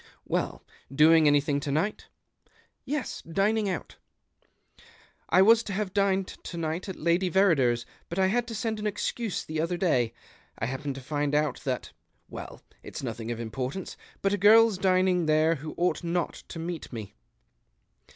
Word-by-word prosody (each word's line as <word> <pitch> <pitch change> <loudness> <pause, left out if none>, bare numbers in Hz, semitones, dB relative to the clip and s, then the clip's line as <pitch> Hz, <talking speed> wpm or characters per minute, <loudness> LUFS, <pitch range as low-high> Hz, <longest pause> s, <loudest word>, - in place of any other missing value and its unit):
"Well, - - -2 0.3
doing 155 +2 +6
anything 145 0 +3
to 140 0 -3
night? 185 +9 -1 0.3
" - - -36
" - - -48
Yes, 285 -3 -3
dining 200 +5 +1
out." 180 - -5 0.7
" - - -26
I 185 - +6
was 225 +3 +6
to 200 - -4
have 195 -1 -2
dined 195 -1 +2
to 175 - -9
night 165 +3 -3
at 190 - -4
Lady 170 +3 +1
Verrider's. 140 -11 +3 0.2
But 170 - -5
I 190 - +4
had 235 +5 +1
to 230 - -5
send 220 0 -2
an 210 - -1
excuse 210 +1 -2
the 155 0 -2
other 170 +2 -1
day, 125 -11 +2 0.5
I - - -2
happened 135 +3 -4
to 135 - -7
find 145 +1 -1
out 150 -3 +1
that 130 -3 -2 0.2
— - - -44
well, - - -8 0.2
it's - - -8
nothing 115 -2 -5
of 120 -1 -3
importance, 125 - -4 0.3
but 195 0 +2
a 205 - 0
girl's 215 0 +6
dinino; 185 -2 +2
there 155 +1 +4
who 155 +3 -8
ouo; 180 +1 +3
ht - - -11
not 170 0 -1
to - - -8
meet 165 0 -5
me." 105 -4 -7
170 Hz, 180 wpm, -27 LUFS, 145-195 Hz, 0.7 s, doing